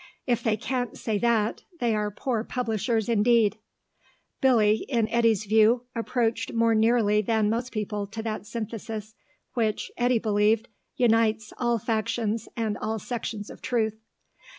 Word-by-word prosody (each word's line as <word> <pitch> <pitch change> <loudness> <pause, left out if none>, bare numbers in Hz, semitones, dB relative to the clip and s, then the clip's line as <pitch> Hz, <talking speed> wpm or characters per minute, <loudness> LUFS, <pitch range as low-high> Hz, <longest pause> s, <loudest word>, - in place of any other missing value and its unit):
If 240 -3 +1
they 215 -2 +1
can't 245 0 -3
say 215 -3 -1
that, 230 -2 +1 0.2
they 235 -2 +1
are 210 -1 0
poor 225 +2 -2
publishers 225 -2 -1
indeed. 220 -1 +3 0.8
Billy, 220 -5 +4
in 230 -5 +1
Eddy's 230 -3 +2
view, 220 +3 +4
approached 230 0 -1
more 230 0 +3
nearly 220 -1 +3
than 215 0 +1
most 240 +3 -2
people 210 -2 -3
to 220 +2 -6
that 215 -1 -4
synthesis 220 -1 -5 0.4
which, 220 -3 -1
Eddy 245 0 +3
believed, 215 +1 +2 0.3
unites 225 -4 +2
all 240 -1 +2
factions 220 0 -1
and 220 -2 -1
all 220 +1 -2
sections 220 -1 -5
of - - -12
truth. 220 -4 -1
225 Hz, 140 wpm, -26 LUFS, 215-235 Hz, 0.8 s, Billy